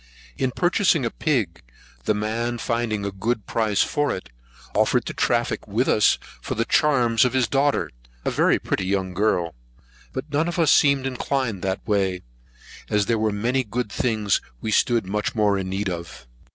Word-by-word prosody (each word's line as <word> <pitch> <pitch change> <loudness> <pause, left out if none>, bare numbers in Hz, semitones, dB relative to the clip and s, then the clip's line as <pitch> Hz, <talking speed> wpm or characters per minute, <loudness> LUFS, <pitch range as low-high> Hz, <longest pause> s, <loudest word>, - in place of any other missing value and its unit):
In 130 - 0
purchasing 175 - +2
a 115 - -1
pig, 115 - -1 0.4
the 105 - +2
man 115 +3 -2
finding 115 -3 -1
a 100 - -2
good 105 +3 -2
price 110 -3 +1
for 145 -1 0
it, - - -6 0.4
offered - - +2
to - - -4
traffic - - 0
with - - 0
us - - +4 0.2
for - - -4
the 115 - 0
charms 120 -8 +3
of 125 -1 +1
his 130 -3 +2
daughter, 140 +3 +1 0.3
a - - +1
very - - +3
pretty 95 - -2
young 95 -1 -1
girl. 90 -4 +1 0.6
But 135 +3 -6
none 155 +3 +1
of 175 - -3
us 165 -4 +4
seemed 140 -2 +4
inclined 130 -5 -2
that 95 +3 -3
way, 95 -4 0 0.7
as 105 -1 +2
there 115 +1 +1
were 110 0 +1
many 120 +6 0
good 115 0 -3
things 110 - +1 0.2
we 110 - -3
stood 115 0 +2
much 105 +4 -2
more 105 -2 +3
in 95 -1 -3
need 95 +1 -2
of. 85 -8 -6
110 Hz, 180 wpm, -23 LUFS, 100-130 Hz, 0.7 s, us